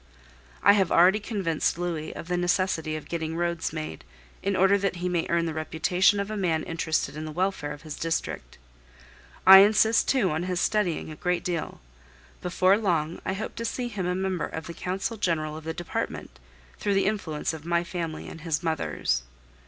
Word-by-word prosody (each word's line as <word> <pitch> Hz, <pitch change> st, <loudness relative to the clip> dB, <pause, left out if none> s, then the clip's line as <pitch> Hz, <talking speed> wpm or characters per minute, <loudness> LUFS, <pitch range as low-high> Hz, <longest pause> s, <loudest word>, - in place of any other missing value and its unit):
I -, -, +8 dB
have 195 Hz, -4 st, +2 dB
already 185 Hz, +5 st, +6 dB
convinced 195 Hz, -8 st, -1 dB
Louis 170 Hz, -3 st, -3 dB
of -, -, -7 dB
the 180 Hz, -, 0 dB
necessity 175 Hz, -3 st, 0 dB
of 155 Hz, -, -7 dB
getting 160 Hz, -1 st, -3 dB
roads 170 Hz, -1 st, -1 dB
made, 155 Hz, -, -6 dB, 0.4 s
in 200 Hz, 0 st, 0 dB
order 190 Hz, +2 st, +5 dB
that 195 Hz, -2 st, -1 dB
he 175 Hz, +1 st, -3 dB
may 175 Hz, -2 st, 0 dB
earn 170 Hz, 0 st, +2 dB
the 160 Hz, -, -2 dB
reputation 170 Hz, +5 st, +2 dB
of 200 Hz, +1 st, -3 dB
a -, -, -3 dB
man 170 Hz, -6 st, 0 dB
interested 160 Hz, -2 st, -1 dB
in 155 Hz, +1 st, -5 dB
the 155 Hz, -, -5 dB
welfare 180 Hz, -3 st, -1 dB
of 150 Hz, +2 st, -9 dB
his 155 Hz, -2 st, -7 dB
district. 155 Hz, -, -3 dB, 0.9 s
I 190 Hz, 0 st, +12 dB
insist 215 Hz, +2 st, +5 dB
too 240 Hz, -, +2 dB
on 155 Hz, +2 st, -1 dB
his 180 Hz, 0 st, -2 dB
studying 180 Hz, -6 st, 0 dB
a -, -, -7 dB
great 180 Hz, +2 st, -1 dB
deal. 170 Hz, -3 st, -3 dB, 0.6 s
Before 185 Hz, +3 st, +3 dB
long 170 Hz, -6 st, 0 dB
I 190 Hz, -, 0 dB
hope 195 Hz, -, -5 dB
to 230 Hz, -, -3 dB
see 245 Hz, +1 st, -2 dB
him 195 Hz, -5 st, -3 dB
a 180 Hz, -, 0 dB
member 190 Hz, -2 st, -1 dB
of 160 Hz, -, -6 dB
the 170 Hz, -, -7 dB
Council 190 Hz, +6 st, -3 dB
General 160 Hz, -6 st, -1 dB
of 160 Hz, 0 st, -9 dB
the 160 Hz, -, -2 dB
Department, 160 Hz, -, -5 dB, 0.4 s
through 200 Hz, -1 st, 0 dB
the 195 Hz, -, +2 dB
influence 170 Hz, -7 st, -1 dB
of 160 Hz, -2 st, -8 dB
my 170 Hz, +1 st, +1 dB
family 170 Hz, -2 st, -5 dB
and 165 Hz, -, -9 dB
his 165 Hz, +1 st, -2 dB
mother's. 150 Hz, -, -1 dB
175 Hz, 195 wpm, -26 LUFS, 160-190 Hz, 0.9 s, I